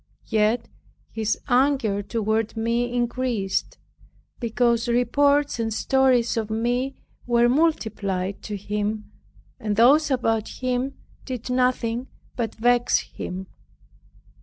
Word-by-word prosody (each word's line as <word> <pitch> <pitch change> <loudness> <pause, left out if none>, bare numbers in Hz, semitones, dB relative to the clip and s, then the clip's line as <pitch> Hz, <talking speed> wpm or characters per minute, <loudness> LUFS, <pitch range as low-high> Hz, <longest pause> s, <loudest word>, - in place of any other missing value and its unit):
Yet 220 +1 +1 0.4
his 220 -1 -1
anger 250 -6 +2
toward 220 +1 -1
me 235 +2 0
increased, 240 -4 -1 0.6
because 235 0 +1
reports 280 +4 +2
and 225 -1 -1
stories 250 0 +2
of 220 -1 -1
me 245 +4 -1 0.3
were 240 0 +4
multiplied 215 - 0
to 210 -1 -4
him, 210 +2 -3 0.5
and 210 -1 -1
those 280 +8 +5
about 225 -5 +1
him 255 +2 -2 0.3
did 250 -1 -5
nothing 250 -1 0 0.3
but 230 -3 -3
vex 245 +1 +3 0.2
him. 185 +1 -5
235 Hz, 105 wpm, -24 LUFS, 220-250 Hz, 0.6 s, those